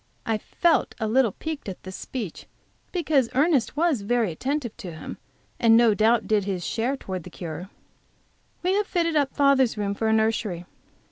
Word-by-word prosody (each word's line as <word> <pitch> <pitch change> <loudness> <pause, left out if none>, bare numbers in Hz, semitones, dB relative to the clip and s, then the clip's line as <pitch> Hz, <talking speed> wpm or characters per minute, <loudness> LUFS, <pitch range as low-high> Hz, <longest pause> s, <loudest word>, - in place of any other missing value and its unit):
I 220 -1 0
felt 335 +8 +1
a 220 - -1
little 230 -2 +3
piqued 315 -8 -5
at 185 - -8
this 185 0 -8
speech, 220 -10 -6 0.4
because 295 -8 +1
Ernest 285 -2 +2
was 315 -8 +2
very 225 -1 +1
attentive 260 - -3
to 195 -7 -7
him, 160 - -8 0.4
and 225 -1 +6
no 235 -2 +5
doubt 225 +2 +3
did 210 -3 +2
his 185 -3 -3
share 245 +5 -1
towards 185 -7 -5
the 180 - -10
cure. 170 +1 -7 0.9
We 365 +1 +2
have 415 +1 +1
fitted 335 -3 0
up 285 -2 +1
father's 275 -5 +3
room 200 -1 -1
for 220 +2 -1
a 220 - +3
nursery. 220 -5 0
230 Hz, 180 wpm, -25 LUFS, 200-280 Hz, 0.9 s, and